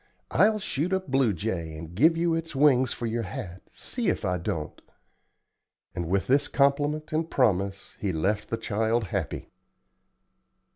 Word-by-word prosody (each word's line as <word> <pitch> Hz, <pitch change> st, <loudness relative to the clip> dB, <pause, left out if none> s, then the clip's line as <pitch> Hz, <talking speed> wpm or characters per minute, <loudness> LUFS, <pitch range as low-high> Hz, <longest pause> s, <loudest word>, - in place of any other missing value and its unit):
I'll 215 Hz, 0 st, +4 dB
shoot 180 Hz, -3 st, -2 dB
a 190 Hz, -, +3 dB
blue 135 Hz, -, +1 dB
jay, 85 Hz, -4 st, -3 dB
and 80 Hz, +1 st, -8 dB
give 160 Hz, -, +4 dB
you 170 Hz, 0 st, +2 dB
its 165 Hz, -2 st, -3 dB
wings 130 Hz, -3 st, +4 dB
for 120 Hz, -, -4 dB
your 115 Hz, +1 st, -1 dB
hat, 95 Hz, -4 st, -6 dB
see -, -, -2 dB
if -, -, -1 dB
I 90 Hz, 0 st, 0 dB
don't;" 80 Hz, -2 st, -4 dB, 1.1 s
and 85 Hz, -1 st, -3 dB
with 95 Hz, +1 st, +1 dB
this 140 Hz, +2 st, +3 dB
compliment 145 Hz, +2 st, +1 dB
and 160 Hz, +1 st, 0 dB
promise 100 Hz, -6 st, 0 dB
he 100 Hz, -, -1 dB
left 100 Hz, +6 st, -1 dB
the 115 Hz, -, -1 dB
child 110 Hz, +2 st, 0 dB
happy. -, -, -3 dB
120 Hz, 155 wpm, -27 LUFS, 95-145 Hz, 1.1 s, I'll